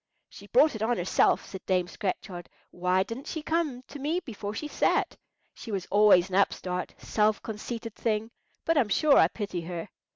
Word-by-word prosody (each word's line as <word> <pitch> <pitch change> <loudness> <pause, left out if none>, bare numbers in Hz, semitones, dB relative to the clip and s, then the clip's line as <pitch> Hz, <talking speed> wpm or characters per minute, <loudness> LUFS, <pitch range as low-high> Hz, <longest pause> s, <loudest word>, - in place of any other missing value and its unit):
"She - - -13
brought 315 -11 +4
it 220 - -6
on 230 +2 +1
herself," 175 +1 +2
said 190 -1 -9
Dame 180 -2 +1
Scratchard. 180 -1 -5 0.2
"Why 180 +1 +1
didn't 230 +7 -8
she 315 - -4
come 310 -6 -1
to 285 +2 -10
me 305 +6 0
before 210 - -6
she 300 - -4
sat? - - +1 0.4
She 225 - -9
was 190 -3 -2
always 205 -3 +6
an 190 - -4
upstart, 180 -2 0
self 215 0 +1
conceited 225 +1 -6
thing; 220 0 -2 0.3
but 330 -2 +3
I'm 230 -6 +1
sure 290 +6 +4
I - - +6
pity 200 -5 -4
her." 170 +2 -6
210 Hz, 185 wpm, -28 LUFS, 185-250 Hz, 0.4 s, always